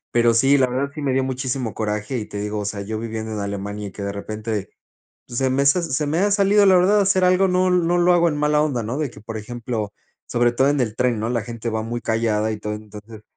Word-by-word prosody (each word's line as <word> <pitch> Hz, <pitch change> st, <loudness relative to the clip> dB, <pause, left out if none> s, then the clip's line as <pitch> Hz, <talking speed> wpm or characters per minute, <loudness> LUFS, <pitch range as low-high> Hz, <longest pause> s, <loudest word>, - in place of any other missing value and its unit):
Pero 120 Hz, -1 st, +4 dB
sí, 135 Hz, +4 st, +4 dB
la 130 Hz, -, +4 dB
verdad 135 Hz, +3 st, -2 dB
sí 155 Hz, -, -6 dB
me 140 Hz, -2 st, 0 dB
dio 130 Hz, 0 st, +1 dB
muchísimo 130 Hz, -3 st, -3 dB
coraje 105 Hz, +3 st, -2 dB
y, 105 Hz, -, -5 dB
te 105 Hz, -, -7 dB
digo, 105 Hz, +1 st, -3 dB
o 105 Hz, -, -4 dB
sea, 100 Hz, 0 st, -3 dB
yo 110 Hz, +2 st, -4 dB
viviendo 110 Hz, -1 st, -5 dB
en 105 Hz, -, -3 dB
Alemania 100 Hz, +1 st, -4 dB
y -, -, -9 dB
que 100 Hz, -, -7 dB
de 100 Hz, -, -2 dB
repente, 105 Hz, 0 st, -4 dB, 0.6 s
pues 120 Hz, -, -6 dB
se 130 Hz, -1 st, +1 dB
me 140 Hz, +2 st, +1 dB
se 170 Hz, +5 st, +4 dB
se 150 Hz, 0 st, -1 dB
me 160 Hz, +3 st, 0 dB
ha 205 Hz, +2 st, +2 dB
salido, 200 Hz, 0 st, +4 dB
la 190 Hz, -, +6 dB
verdad, 195 Hz, +4 st, +4 dB
hacer 195 Hz, -1 st, +2 dB
algo, 185 Hz, +1 st, +4 dB
no 185 Hz, 0 st, +2 dB
no 175 Hz, -1 st, +2 dB
lo 175 Hz, +1 st, +4 dB
hago 170 Hz, -1 st, +4 dB
en 150 Hz, -, -2 dB
mala 150 Hz, 0 st, +2 dB
onda, 140 Hz, -6 st, 0 dB
¿no?, 120 Hz, +6 st, -3 dB
de 150 Hz, -3 st, -1 dB
que, 120 Hz, -, -14 dB
por 110 Hz, +1 st, -7 dB
ejemplo, 110 Hz, -1 st, -4 dB, 0.3 s
sobre 120 Hz, 0 st, +2 dB
todo 130 Hz, +3 st, +2 dB
en 145 Hz, -2 st, +1 dB
el 110 Hz, -3 st, -1 dB
tren, 125 Hz, -3 st, +1 dB
¿no? 110 Hz, -, -1 dB
La 120 Hz, -3 st, 0 dB
gente 115 Hz, 0 st, -5 dB
va 110 Hz, 0 st, -2 dB
muy 120 Hz, +1 st, -4 dB
callada 110 Hz, -1 st, 0 dB
y 110 Hz, -, -3 dB
todo, 105 Hz, 0 st, -4 dB
entonces, 105 Hz, +1 st, -11 dB
120 Hz, 270 wpm, -22 LUFS, 110-150 Hz, 0.6 s, la